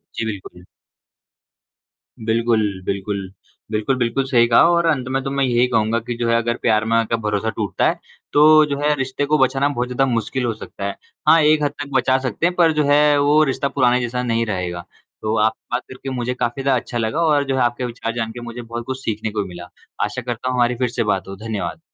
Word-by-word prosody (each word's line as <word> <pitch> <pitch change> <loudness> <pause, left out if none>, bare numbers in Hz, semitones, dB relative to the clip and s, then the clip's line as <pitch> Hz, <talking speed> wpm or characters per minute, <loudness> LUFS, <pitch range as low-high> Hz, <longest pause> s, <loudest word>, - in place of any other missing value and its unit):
जी, 115 - -2
बिल्कुल। 95 -4 -7 1.6
बिल्कुल, 115 0 +2 0.2
बिल्कुल। 100 -1 -3 0.4
बिल्कुल, 110 +5 0
बिल्कुल 125 +2 0
सही 120 -3 +3
कहा 115 - +5
और 170 0 +2
अंत 130 -5 0
में 135 0 0
तो 135 - -3
मैं 140 0 0
यही 125 -1 +3
कहूँगा 115 -1 +1
कि 120 +1 -5
जो 120 - -1
है 115 - +3
अगर 120 0 0
प्यार 110 -1 +2
में 115 0 +1
आके 115 0 +1
भरोसा 105 +1 -1
टूटता 105 -2 0
है, - - -3 0.3
तो 155 +1 +7
जो 140 -1 -3
है 150 0 +3
रिश्ते 135 +1 -2
को 150 +2 +2
बचाना 135 +1 +2
बहुत 125 -3 -2
ज़्यादा 125 +2 +1
मुश्किल 120 +2 -1
हो 115 - 0
सकता 100 -2 -8
है। 100 - -3 0.3
हाँ, 160 +2 +7
एक 150 0 +4
हद 145 - +1
तक 145 - -10
बचा 130 +1 +2
सकते 130 +8 -2
हैं 180 - +1
पर 170 -2 +4
जो 150 - +1
है 145 0 +5
वो 150 +2 +4
रिश्ता 140 - -1
पुराने 125 -2 +2
जैसा 125 +1 -2
नहीं 115 -1 0
रहेगा। 90 -4 -4 0.4
तो 110 +1 -1
आप 110 - +2 0.2
का 120 - +1
करके 130 +1 -9
मुझे 125 -1 -2
काफ़ी 125 +1 -2
ज़्यादा 130 -2 +2
अच्छा 120 - -6
लगा 115 +7 -1
और 150 -2 +3
जो 135 - 0
है 130 - +1
आपके 120 +1 0
विचार 115 -1 -4
जानके 115 0 -4
मुझे 120 0 -7
बहुत 120 0 -6
कुछ 130 0 -4
सीखने 110 0 -2
को 105 -1 -1
भी - - -8
मिला। 90 0 -10 0.4
आशा - - -4
करता 120 +1 -4
हूँ 125 - -1
हमारी 120 0 +2
फ़िर 125 0 -1
से 120 0 -1
बात 105 -3 -1
हो। 95 - -7
धन्यवाद। 95 -6 -5
120 Hz, 230 wpm, -20 LUFS, 110-135 Hz, 1.6 s, तो